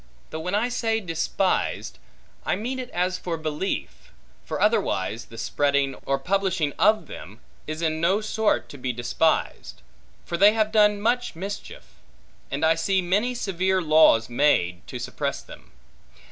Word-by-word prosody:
Though 160 - -4
when 180 +4 -2
I 220 +4 +1
say 225 -2 0
despised, 180 0 -1 0.4
I - - 0
mean 250 +5 -4
it 250 -1 -6
as 180 +1 -1
for 170 -2 -3
belief; 155 +4 -4 0.3
for - - -4
otherwise, 120 - 0
the 115 - -13
spreading, 140 +3 +1
or 135 - +2
publishing, 190 -5 0
of 215 +2 +4
them, - - -10 0.3
is 155 +2 -4
in 160 0 0
no 190 +5 +3
sort 220 0 0
to 145 - -11
be 125 0 -2
despised. 120 +7 -1 0.4
For 170 - -3
they 205 +4 +6
have 215 -1 +1
done 210 -1 +4
much 245 -2 0
mischief; 195 +4 -7 0.7
and 140 +3 -1
I 160 - +5
see 185 +3 0
many 210 +8 +1
severe 190 -3 0
laws 155 -9 +5
made, 120 -9 +1
to - - -6
suppress - - -4
them. - - -14
180 Hz, 155 wpm, -24 LUFS, 155-210 Hz, 0.7 s, they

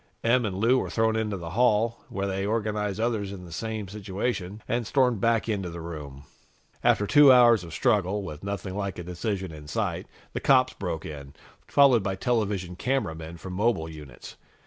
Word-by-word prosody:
Em 120 +1 +3
and 95 -2 -4
Lou 120 +5 +3
were - - -3
thrown 110 0 +1
into 105 -3 -1
the 85 -2 -7
hall, 115 +1 +2
where 100 0 -3
they 95 0 -2
organized 105 -1 -1
others 110 -4 -1
in 95 -2 -8
the 85 - -12
same 110 +3 -4
situation, 100 0 -4
and 120 -2 -1
stormed 125 -6 +2
back 115 0 +2
into 100 -5 -2
the 85 0 -7
room. 75 -5 -8 0.6
After 105 - +3
two 145 +4 +7
hours 120 -5 +6
of 85 - -9
struggle, 105 - +1
with 75 -4 -8
nothing 100 -2 -4
like 100 -2 -3
a 90 - -5
decision 95 +1 -3
in 75 -2 -11
sight, - - -2 0.3
the - - -2
cops - - +4
broke 80 - -4
in, 70 -2 -8 0.3
followed 135 -5 +5
by 95 0 -2
television 100 -5 -1
cameramen 85 -9 -2
from 90 +2 -8
mobile 100 -4 +1
units. 75 -3 -11
100 Hz, 185 wpm, -26 LUFS, 90-115 Hz, 0.6 s, two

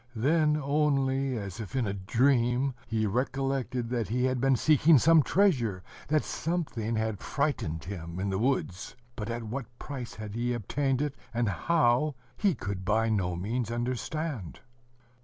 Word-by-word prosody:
Then 150 +5 +3
only, 135 -3 +1
as 100 0 -6
if 110 +2 -6
in 130 -3 +1
a 100 - -1
dream, 125 +5 +2
he 110 -2 0
recollected 130 +1 -1
that 120 -5 0
he 125 +4 0
had 130 -1 +1
been 135 0 +4
seeking 155 +4 +5
some 160 +5 +6
treasure, 125 - +2 0.2
that 155 0 +2
something 145 -10 -2
had 110 -2 -1
frightened 90 - -1
him 85 -1 -6
in 100 +1 -1
the 95 - -1
woods.... 115 -7 -1 0.2
But 110 -1 -5
at 115 0 -3
what 120 +2 -4
price 130 -5 -6
he 110 +3 -3
had - - -1
obtained 135 +4 0
it, 145 -2 -2 0.2
and 120 -1 +1
how, 130 - +2 0.2
he 200 -6 +2
could 95 -4 -4
by 110 +3 +2
no 95 -5 0
means 110 +6 -2
understand. 125 - -3
120 Hz, 160 wpm, -29 LUFS, 110-140 Hz, 0.2 s, some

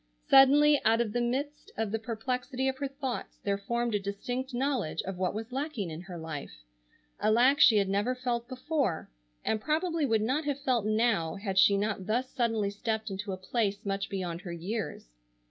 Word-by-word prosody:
Suddenly, 285 +2 +7
out 225 +1 +4
of 225 -3 0
the 240 - +1
midst 275 +5 -2
of 220 -2 -1
the 225 - -1
perplexity 250 +3 -2
of 265 0 -2
her 280 - -1
thoughts, 270 -2 -5
there 200 -1 0
formed 235 +3 -1
a 205 - +2
distinct 245 +7 -4
knowledge 255 - -1
of 190 -1 -5
what 185 +1 0
was 225 +3 -5
lacking 260 - -3
in 155 +2 -6
her 180 -1 -8
life, 145 - -7 0.6
a - - +2
lack 250 +6 +5
she 225 -8 +7
had 200 -1 +2
never 205 +6 0
felt 240 -2 -2
before, 255 - -2 0.3
and 215 - 0
probably 320 +1 0
would 220 -3 +2
not 275 +7 0
have 285 -1 -1
felt 245 -6 +1
now 215 -7 +1
had 195 -1 -1
she 200 +1 +6
not 200 -2 -2
thus 245 +4 0
suddenly 225 -5 0
stepped 220 +1 -3
into 195 +1 -4
a 185 - -3
place 200 +1 -1
much 195 0 -2
beyond 180 -3 -3
her 185 -3 -7
years. 180 - -4
225 Hz, 195 wpm, -30 LUFS, 200-260 Hz, 0.6 s, Suddenly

